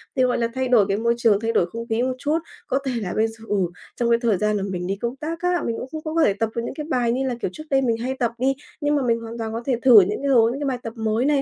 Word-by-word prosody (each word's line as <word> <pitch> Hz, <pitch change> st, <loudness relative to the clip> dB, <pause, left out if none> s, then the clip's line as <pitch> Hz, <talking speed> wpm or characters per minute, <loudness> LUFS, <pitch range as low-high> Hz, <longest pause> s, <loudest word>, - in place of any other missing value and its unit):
thì, 260 Hz, -, +3 dB
gọi 250 Hz, -1 st, +2 dB
là, 235 Hz, -, +1 dB
thay 260 Hz, 0 st, 0 dB
đổi 240 Hz, -5 st, +5 dB
cái 195 Hz, -, 0 dB
môi 235 Hz, +2 st, +2 dB
trường, 225 Hz, -4 st, +3 dB
thay 225 Hz, +1 st, -1 dB
đổi 200 Hz, -, +3 dB
không 230 Hz, +6 st, -7 dB
khí 225 Hz, +1 st, 0 dB
một 255 Hz, 0 st, 0 dB
chút. 295 Hz, +5 st, 0 dB, 0.3 s
Có 270 Hz, -, +1 dB
thể 265 Hz, -, 0 dB
là 185 Hz, -3 st, -3 dB
bây 220 Hz, +1 st, +3 dB
giờ, 225 Hz, 0 st, -12 dB
ừ, 205 Hz, -, 0 dB, 0.4 s
trong 235 Hz, -1 st, 0 dB
cái 235 Hz, 0 st, +4 dB
thời 225 Hz, -6 st, +2 dB
gian 210 Hz, +2 st, +1 dB
mà 195 Hz, -, -2 dB
mình 180 Hz, -1 st, -3 dB
đi 195 Hz, -, -1 dB
công 235 Hz, +5 st, -3 dB
tác 320 Hz, +4 st, -5 dB
á, 360 Hz, -1 st, +1 dB
mình 230 Hz, -, -1 dB
cũng 255 Hz, -, -6 dB, 0.2 s
không 310 Hz, 0 st, -4 dB
có 330 Hz, -, +4 dB
thể 200 Hz, -, +4 dB
tập 220 Hz, +2 st, -1 dB
được 235 Hz, -, -1 dB
những -, -, -4 dB
cái 300 Hz, +2 st, -6 dB
bài 245 Hz, -5 st, +1 dB
như 265 Hz, +2 st, 0 dB
là, 250 Hz, -, -1 dB
kiểu, -, -, -1 dB
trước 310 Hz, -, -8 dB
đây 270 Hz, -1 st, +3 dB
mình 235 Hz, -3 st, +1 dB
hay 250 Hz, +3 st, -2 dB
tập 240 Hz, -3 st, +1 dB
đi, 265 Hz, +2 st, +2 dB, 0.3 s
nhưng 295 Hz, 0 st, +2 dB
mà 285 Hz, -, +1 dB
mình 230 Hz, -1 st, +2 dB
hoàn 230 Hz, 0 st, -8 dB
toàn 220 Hz, -1 st, -4 dB
có 230 Hz, -, -3 dB
thể 265 Hz, -, +1 dB
thử 245 Hz, -6 st, +9 dB
những 200 Hz, +6 st, -1 dB
cái 280 Hz, -, -1 dB
hướng, 235 Hz, +1 st, +4 dB
những 290 Hz, -, -2 dB
bài 260 Hz, -2 st, -1 dB
tập 225 Hz, -, -5 dB
mới 220 Hz, +2 st, 0 dB
này, 285 Hz, -1 st, +3 dB
235 Hz, 340 wpm, -23 LUFS, 225-265 Hz, 0.4 s, thử